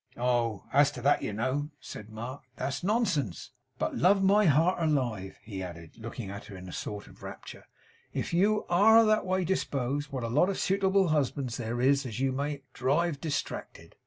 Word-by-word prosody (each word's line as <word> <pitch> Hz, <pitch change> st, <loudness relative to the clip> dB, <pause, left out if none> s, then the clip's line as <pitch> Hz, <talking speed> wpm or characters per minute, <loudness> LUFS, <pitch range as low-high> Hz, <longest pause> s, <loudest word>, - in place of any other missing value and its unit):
'Oh! 120 Hz, -4 st, 0 dB
as 140 Hz, +1 st, +6 dB
to 125 Hz, -, -7 dB
that, 145 Hz, +2 st, +4 dB
you -, -, -2 dB
know,' 130 Hz, +7 st, -1 dB
said 105 Hz, 0 st, -9 dB
Mark, 120 Hz, +5 st, -7 dB
'that's 135 Hz, +4 st, -3 dB
nonsense. 185 Hz, -, 0 dB, 0.3 s
But -, -, -2 dB
love 195 Hz, +2 st, +4 dB
my 205 Hz, +2 st, +5 dB
heart 165 Hz, +5 st, +3 dB
alive!' 120 Hz, -, -1 dB
he 100 Hz, -3 st, -6 dB
added, 85 Hz, +1 st, -9 dB
looking 115 Hz, -2 st, -6 dB
at 100 Hz, 0 st, -8 dB
her 100 Hz, -, -10 dB
in 95 Hz, 0 st, -9 dB
a -, -, -8 dB
sort 105 Hz, +3 st, -5 dB
of -, -, -17 dB
rapture, -, -, -9 dB, 0.5 s
'if -, -, -3 dB
you 210 Hz, +5 st, +3 dB
ARE 220 Hz, +6 st, +6 dB
that 215 Hz, -3 st, +2 dB
way 185 Hz, 0 st, +1 dB
disposed, 145 Hz, -5 st, -1 dB
what 130 Hz, -3 st, -3 dB
a -, -, -1 dB
lot 150 Hz, +11 st, +3 dB
of 195 Hz, -, -2 dB
suitable 195 Hz, -1 st, +2 dB
husbands 140 Hz, -4 st, 0 dB
there 120 Hz, 0 st, -3 dB
is 135 Hz, +3 st, +3 dB
as 115 Hz, 0 st, -5 dB
you 135 Hz, 0 st, +1 dB
may 140 Hz, +1 st, -3 dB
drive 145 Hz, +4 st, 0 dB
distracted! 150 Hz, -3 st, -4 dB
140 Hz, 190 wpm, -29 LUFS, 115-175 Hz, 0.5 s, as